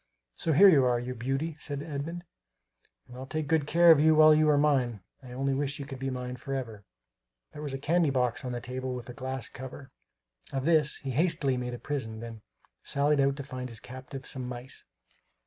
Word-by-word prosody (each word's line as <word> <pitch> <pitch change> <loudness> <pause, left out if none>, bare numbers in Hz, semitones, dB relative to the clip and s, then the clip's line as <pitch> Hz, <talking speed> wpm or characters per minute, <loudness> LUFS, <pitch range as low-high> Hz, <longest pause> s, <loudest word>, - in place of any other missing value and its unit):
"So 160 - -1
here 195 +8 +8
you 150 -8 +6
are, 125 -1 +2
you 125 +1 -4
beauty," 135 +6 -2
said 145 -1 -5
Edmund, 160 +3 -5 0.8
"and 125 - -12
I'll 130 +1 -8
take 155 +1 -3
good 155 -2 +1
care 170 +2 +6
of 160 - +7
you 155 +1 +5
while 155 0 +8
you 155 0 +4
are 145 - +4
mine; 130 -7 +2 0.2
I 125 -2 -12
only 135 +2 -1
wish 140 +1 -1
you 140 - -6
could 135 -2 -8
be 135 0 -2
mine 125 -1 -5
forever!" 125 -6 -5 0.7
There 150 - -9
was 145 -3 -4
a - - -3
candy 160 +3 +2
box 125 -2 0
on 125 - -4
the 120 0 -4
table 130 +1 -4
with 125 -1 -8
a - - -6
glass 130 0 -4
cover. 130 +1 -9 0.6
Of 135 -1 -2
this 155 -3 +3
he 135 - -5
hastily 155 -2 +1
made 125 -1 -3
a - - -7
prison, 120 -6 -4
then 115 -1 -8 0.4
sallied 145 +1 +1
out 135 0 +3
to 140 - -6
find 130 -2 -6
his 115 -2 -6
captive 130 +2 -9
some 130 -3 -4
mice. 125 +1 -8
135 Hz, 215 wpm, -29 LUFS, 125-150 Hz, 0.8 s, here